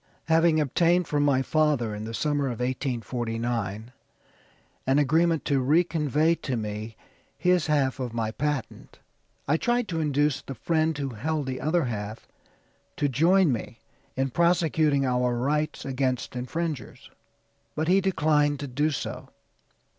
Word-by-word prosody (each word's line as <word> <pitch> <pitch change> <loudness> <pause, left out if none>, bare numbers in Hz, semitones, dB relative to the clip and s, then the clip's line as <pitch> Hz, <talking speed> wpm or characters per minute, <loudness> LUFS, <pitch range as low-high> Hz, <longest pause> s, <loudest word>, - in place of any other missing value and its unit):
"Having 165 0 +4
obtained 170 +4 +2
from 145 -1 0
my 140 -2 +3
father, 145 -8 +1
in 105 +1 -5
the 115 - -6
summer 145 0 0
of 125 -3 -3
1849, 120 -4 -3 1.0
an 135 +1 +3
agreement 160 +3 +2
to 140 -2 +2
re 150 +7 +4
convey 155 -1 +1
to 135 -6 -3
me 105 +1 -5 0.4
his 180 0 +2
half 140 -4 +1
of 125 -2 -3
my 115 -1 -2
patent; 145 +3 -4 0.5
I 150 +3 +3
tried 240 +4 0
to 165 -2 -2
induce 145 -2 +1
the 135 - -8
friend 160 +4 0
who 140 -2 -2
held 145 +6 -2
the 130 -1 -4
other 165 +2 +1
half 110 -3 -5 0.7
to 145 - +1
join 165 +5 +4
me 115 -1 -4 0.4
in 135 0 -1
prosecuting 160 -4 +2
our 125 -1 +1
rights 150 +5 -1
against 130 -2 -2
infringers, 150 +3 -5 0.6
but 155 +1 -1
he 190 +2 +4
declined 150 -6 +2
to 145 - -4
do 145 +4 0
so. 145 - -5
145 Hz, 145 wpm, -26 LUFS, 125-160 Hz, 1.0 s, Having